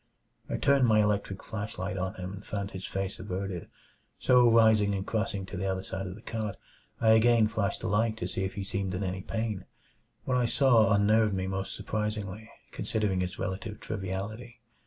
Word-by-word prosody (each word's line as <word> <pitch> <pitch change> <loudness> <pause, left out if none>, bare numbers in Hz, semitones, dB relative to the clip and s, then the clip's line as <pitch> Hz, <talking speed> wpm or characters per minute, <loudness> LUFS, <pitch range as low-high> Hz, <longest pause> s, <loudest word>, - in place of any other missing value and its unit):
I - - -1
turned 140 -3 +4
my 110 -1 +5
electric 105 -2 0
flashlight 105 -4 -4
on 95 +2 -2
him 90 0 -6
and 100 +1 -9
found 100 -2 -4
his 95 0 -6
face 95 0 -3
averted; 95 -1 -4 0.5
so 125 -1 +5
rising 110 -3 +5
and 95 0 -3
crossing 105 -3 -1
to 95 - -8
the 95 +1 -1
other 95 0 -1
side 95 0 -4
of 90 - -6
the 110 - -14
cot, 110 -4 -3 0.4
I 115 - +3
again 110 0 +5
flashed 105 -3 -1
the - - -2
light 110 +2 +1
to - - -3
see 95 - -2
if 95 - -3
he 100 - -3
seemed 95 -1 -2
in 95 - -2
any 95 0 -2
pain. 110 -1 -3 0.6
What 125 - +1
I 125 -1 +2
saw 120 -5 +4
unnerved 105 0 +4
me 95 0 -1
most 95 0 -3
surprisingly, 105 0 -3 0.2
considering 105 -4 -1
its 90 0 -3
relative 105 +3 -4
triviality. 110 +4 -5
105 Hz, 190 wpm, -29 LUFS, 95-110 Hz, 0.6 s, my